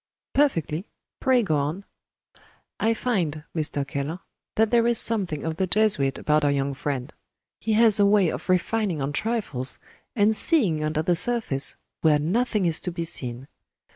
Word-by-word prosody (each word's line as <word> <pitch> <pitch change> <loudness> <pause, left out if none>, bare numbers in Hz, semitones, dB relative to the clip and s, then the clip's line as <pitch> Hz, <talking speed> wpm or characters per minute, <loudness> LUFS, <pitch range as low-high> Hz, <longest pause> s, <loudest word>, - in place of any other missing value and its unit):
"Perfectly. 180 - 0 0.3
Pray 255 -2 +3
go 155 -7 0
on." 155 +8 -3 0.9
"I 225 +1 +1
find, 175 -11 -2
Mr. 145 -3 -1
Keller, 145 +3 -4 0.4
that 220 0 +2
there 235 -1 +3
is 235 -1 +2
something 190 -12 +1
of 160 -1 -3
the 190 - 0
Jesuit 180 -10 +1
about 150 0 +1
our 145 - +3
young 140 0 -1
friend. 135 0 -4 0.5
He 220 - -1
has 220 -1 +6
a 200 - +5
way 200 -4 +4
of - - -6
refining 185 -1 0
on 140 +1 -3
trifles, 150 - +1 0.4
and 215 0 +3
seeing 205 - +2
under 155 0 -1
the 175 +1 +2
surface, 180 - 0 0.3
where 155 -2 +4
nothing 210 +6 0
is 165 -2 +2
to 180 - -4
be 170 -1 -4
seen. 125 -4 -5
170 Hz, 165 wpm, -24 LUFS, 150-220 Hz, 0.9 s, has